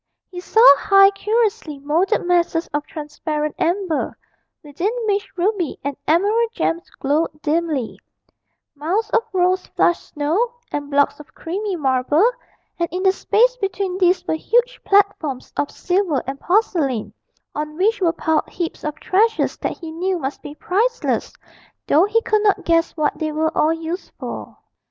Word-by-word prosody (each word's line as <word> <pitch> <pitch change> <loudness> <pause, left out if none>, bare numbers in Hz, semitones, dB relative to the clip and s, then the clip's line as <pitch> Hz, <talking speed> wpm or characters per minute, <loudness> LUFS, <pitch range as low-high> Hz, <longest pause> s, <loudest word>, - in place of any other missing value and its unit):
He 360 - -6
saw 445 +6 +4
high 390 0 +6
curiously 410 -7 -1
moulded 330 +9 0
masses 345 -1 +1
of 295 0 -2
transparent 300 -3 -4
amber, 345 -2 -1 0.5
within 300 +7 -2 0.2
which 410 0 -1
ruby 360 -3 0
and 285 0 -3
emerald 415 +8 +2
gems 340 -7 -2
glowed 300 +2 -1
dimly; 310 -5 -1 0.7
mounds 335 +10 -2
of 460 - +3
rose 370 0 +1
flushed 345 - +1
snow, 345 +12 0 0.2
and 290 -1 -4
blocks 285 +1 +2
of 300 - -14
creamy 390 +4 -3
marble; 290 - +2 0.5
and 340 -1 0
in 365 +2 -3
the 380 - +5
space - - +2
between 390 -3 -2
these 365 0 +3
were - - -1
huge 480 +9 0
platforms 395 -10 +1
of 290 - -1
silver 355 -6 0
and 270 +1 -5
porcelain, 335 - 0 0.4
on 300 0 -4
which 415 +4 +1
were 340 -3 +3
piled 320 -2 -1
heaps 340 -2 -5
of 300 0 -3
treasures 440 +4 +1
that - - -4
he 330 -2 -8
knew 365 +3 -1
must 275 -3 -5
be 290 - -9
priceless, 440 +10 -1 0.6
though 320 +5 +5
he 450 +2 +1
could 430 -1 +2
not 415 -2 +1
guess 330 0 +1
what 300 -1 0
they 310 -1 -1
were 315 +1 -1
all 310 - +3
used 330 +3 -5
for. - - -7
345 Hz, 155 wpm, -20 LUFS, 300-400 Hz, 0.7 s, high